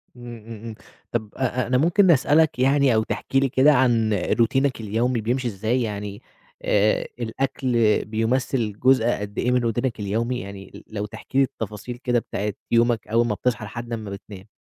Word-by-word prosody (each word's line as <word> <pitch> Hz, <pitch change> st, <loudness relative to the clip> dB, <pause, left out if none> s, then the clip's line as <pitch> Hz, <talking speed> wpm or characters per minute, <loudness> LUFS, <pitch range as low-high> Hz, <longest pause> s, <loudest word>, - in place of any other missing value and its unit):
إمم، 120 Hz, -1 st, -9 dB
إمم، 115 Hz, -2 st, -9 dB
إمم، 115 Hz, -1 st, -6 dB, 0.4 s
طب 110 Hz, -3 st, -2 dB
أ 125 Hz, -1 st, -1 dB
أ -, -, -5 dB
أنا 125 Hz, +1 st, +2 dB
ممكن 175 Hz, +6 st, +4 dB
أسألك 150 Hz, 0 st, +3 dB
يعني، 135 Hz, -1 st, +4 dB
أو 110 Hz, -, +3 dB
تحكي 135 Hz, +4 st, -1 dB
لي 135 Hz, 0 st, +1 dB
كده، 135 Hz, +4 st, +5 dB
عن 120 Hz, -5 st, +3 dB
روتينك 120 Hz, +6 st, +1 dB
اليومي، 115 Hz, +3 st, 0 dB
بيمشي 125 Hz, +3 st, -1 dB
إزاي، 110 Hz, +4 st, -1 dB
يعني 105 Hz, -2 st, -4 dB, 0.4 s
آآ 105 Hz, +1 st, +2 dB
الأكل 125 Hz, +2 st, -2 dB, 0.3 s
بيُمثل 115 Hz, 0 st, -1 dB
جزء 130 Hz, -2 st, +4 dB
قد 105 Hz, +1 st, -7 dB
إيه، 125 Hz, -, +1 dB
من 125 Hz, -, +3 dB
روتينك 120 Hz, +1 st, -1 dB
اليومي؟ 115 Hz, +5 st, -1 dB
يعني 100 Hz, -2 st, -9 dB
أ -, -, -11 dB
لو 105 Hz, -1 st, -2 dB
تحكي 120 Hz, +5 st, -7 dB
لي 135 Hz, -, +6 dB
التفاصيل 110 Hz, 0 st, -5 dB
كده، 120 Hz, -1 st, +1 dB
بتاعة 105 Hz, -2 st, -4 dB, 0.2 s
يومك، 115 Hz, -2 st, +2 dB
أول 115 Hz, +2 st, +2 dB
ما 105 Hz, -, -1 dB
بتصحى، 120 Hz, 0 st, -1 dB
لحد 120 Hz, +3 st, -7 dB
أمّا 110 Hz, -3 st, -5 dB
بتنام. 100 Hz, 0 st, -10 dB
120 Hz, 180 wpm, -23 LUFS, 110-130 Hz, 0.4 s, لي